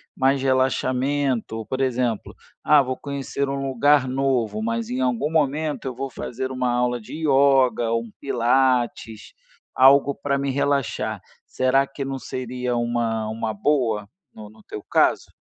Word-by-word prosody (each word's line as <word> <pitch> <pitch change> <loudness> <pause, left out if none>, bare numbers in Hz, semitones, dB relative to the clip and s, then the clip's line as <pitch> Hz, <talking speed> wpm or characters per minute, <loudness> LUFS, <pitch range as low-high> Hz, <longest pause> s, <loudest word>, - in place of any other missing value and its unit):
mais 135 +1 +2
relaxamento, 130 -3 0
por 130 0 -3
exemplo: 125 -4 -1 0.3
"ah, 150 -2 +6
vou 130 0 -3
conhecer 140 -1 -4
um 135 0 -3
lugar 135 +1 +3
novo, 125 -5 0
mas 115 0 -2
em 130 +1 -2
algum 130 +4 0
momento 150 -1 0
eu 125 - -4
vou 135 +1 -4
fazer 130 +3 -5
uma 130 -1 -1
aula 125 -1 0
de - - -11
ioga 135 -5 +3
ou 115 0 0
um 115 - -12
pilates, 125 -3 0 0.4
algo 140 +1 +5
pra 140 0 -1
me 140 0 -1
relaxar." 135 -6 -1 0.3
Será 130 +2 +2
que 135 0 -6
não 135 -1 -4
seria 125 -1 -4
uma 115 -2 -1
uma 110 0 -3
boa 115 -4 0 0.3
no 105 -1 -11
no 110 0 -19
teu 105 - -8
caso? - - +1
130 Hz, 150 wpm, -23 LUFS, 115-135 Hz, 0.4 s, ah